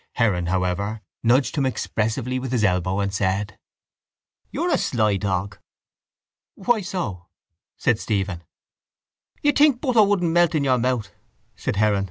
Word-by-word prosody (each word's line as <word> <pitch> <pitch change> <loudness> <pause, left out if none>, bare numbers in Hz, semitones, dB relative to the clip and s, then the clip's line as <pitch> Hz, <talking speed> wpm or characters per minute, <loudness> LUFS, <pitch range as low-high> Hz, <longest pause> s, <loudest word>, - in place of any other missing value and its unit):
Heron, 95 -8 +1
however, 95 +4 -1 0.2
nudged 130 +4 +2
him 140 - +2
expressively 120 +1 -2
with 130 -1 -5
his 120 -4 +1
elbow 90 0 +1
and 100 -1 -2
said: 100 +1 -1 0.9
—You're - - -1
a - - +3
sly 105 -4 +1
dog. 95 0 -2 1.0
—Why 220 +2 +1
so? 110 - -4 0.5
said 115 -2 +1
Stephen. 95 -6 -2 1.0
—You'd 290 0 +3
think 290 -4 +5
butter 250 -5 +3
wouldn't 195 -5 +2
melt 175 -1 +3
in 150 - +1
your 130 -2 +2
mouth, 120 -4 -1 0.5
said - - -3
Heron. 105 0 +2
110 Hz, 140 wpm, -23 LUFS, 100-140 Hz, 1.0 s, think